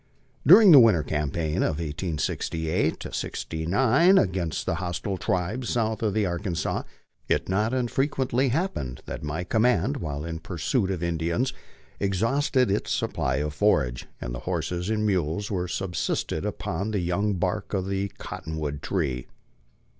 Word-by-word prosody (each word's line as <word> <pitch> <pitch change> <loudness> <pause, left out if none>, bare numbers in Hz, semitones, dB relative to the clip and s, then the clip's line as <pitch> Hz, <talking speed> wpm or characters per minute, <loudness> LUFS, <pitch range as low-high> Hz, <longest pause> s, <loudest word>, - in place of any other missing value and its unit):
During 195 +4 +9
the 145 - +11
winter 105 -10 +5
campaign 75 +2 -2
of 80 - +1
1868 80 0 -2
'69 110 - +2
against 90 - 0
the - - 0
hostile 90 +2 -3
tribes 105 +8 -1
south 110 -2 0
of 110 -3 0
the 110 -2 +2
Arkansas, 85 -2 -2 0.5
it - - +1
not 105 +4 +1
unfrequently 130 +1 0
happened 120 - -2
that - - -6
my 75 +4 -3
command 125 +8 +2
while 75 - -4
in 85 -1 -4
pursuit 95 - -1
of 90 -3 -2
Indians 85 +9 0 0.5
exhausted 115 +5 +1
its 100 - -1
supply 65 0 0
of 75 +2 -2
forage, 70 -10 +1
and - - -5
the - - -4
horses 90 +1 -2
and 110 -1 0
mules 95 0 0
were 90 -2 -1
sub 90 0 -3
sisted - - -1
upon 95 +6 -3
the 105 -2 -1
young 95 +4 0
bark 90 +3 -2
of 95 -1 -1
the 100 0 -1
cottonwood 75 -2 -5
tree. 70 -11 -2
95 Hz, 145 wpm, -26 LUFS, 80-110 Hz, 0.5 s, the